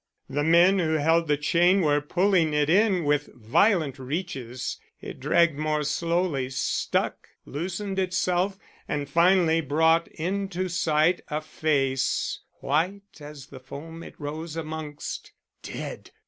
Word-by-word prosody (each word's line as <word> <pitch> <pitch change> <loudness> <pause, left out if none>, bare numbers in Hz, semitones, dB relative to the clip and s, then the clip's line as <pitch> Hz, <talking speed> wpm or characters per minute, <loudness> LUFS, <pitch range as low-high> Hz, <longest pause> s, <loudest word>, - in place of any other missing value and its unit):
The 145 +2 -1
men 175 +5 +5
who 160 -3 +1
held 160 +2 +2
the 150 -1 +2
chain 175 +6 +3
were 145 -3 +2
pulling 175 0 +2
it 150 +1 +2
in 195 -2 +3
with 145 0 +1
violent 140 - +2
reaches. 130 -4 -4 0.2
It - - -9
dragged 170 -4 +2
more 155 -1 0
slowly, 165 -3 0
stuck, 130 - -1 0.2
loosened 190 +6 -4
itself, 185 +1 0 0.3
and 145 -1 -2
finally 170 +1 +4
brought 160 +3 +2
into 185 +1 -3
sight 165 0 +2
a 150 -1 -2
face 140 -4 0 0.2
white 185 +8 -2
as 145 -2 -10
the 135 -2 -12
foam 160 +5 -9
it - - -11
rose 155 +2 -5
amongst. 155 -2 -6 0.3
"Dead! - - -7
160 Hz, 130 wpm, -26 LUFS, 145-180 Hz, 0.3 s, men